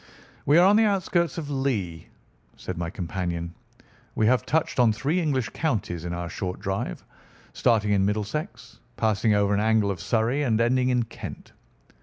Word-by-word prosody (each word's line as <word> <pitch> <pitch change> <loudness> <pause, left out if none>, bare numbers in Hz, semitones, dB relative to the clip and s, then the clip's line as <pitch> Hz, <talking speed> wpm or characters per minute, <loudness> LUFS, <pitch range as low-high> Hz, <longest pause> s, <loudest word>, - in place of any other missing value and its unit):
"We 145 +4 +6
are 175 - +7
on 205 +2 +6
the 225 - +5
outskirts 185 -5 0
of 150 -3 -5
Lee," 105 - -2 0.5
said - - -6
my 85 0 -3
companion. 85 -1 -4 0.6
"We 110 - +2
have 125 +3 +2
touched 155 -3 0
on 120 -3 +5
three 140 +11 0
English 135 -7 0
counties 100 - -2
in 85 - -3
our 85 0 -4
short 90 +2 -4
drive, 95 - -4 0.5
starting 105 -3 +2
in 100 -1 +3
Middlesex, 115 - -3 0.2
passing 110 -1 +2
over 100 0 +2
an 100 - +2
angle 110 -1 +2
of 90 - -6
Surrey, 120 +5 +1
and 115 -6 +1
ending 125 +2 +2
in 125 -1 +2
Kent. 115 - -9
110 Hz, 170 wpm, -25 LUFS, 95-135 Hz, 0.6 s, are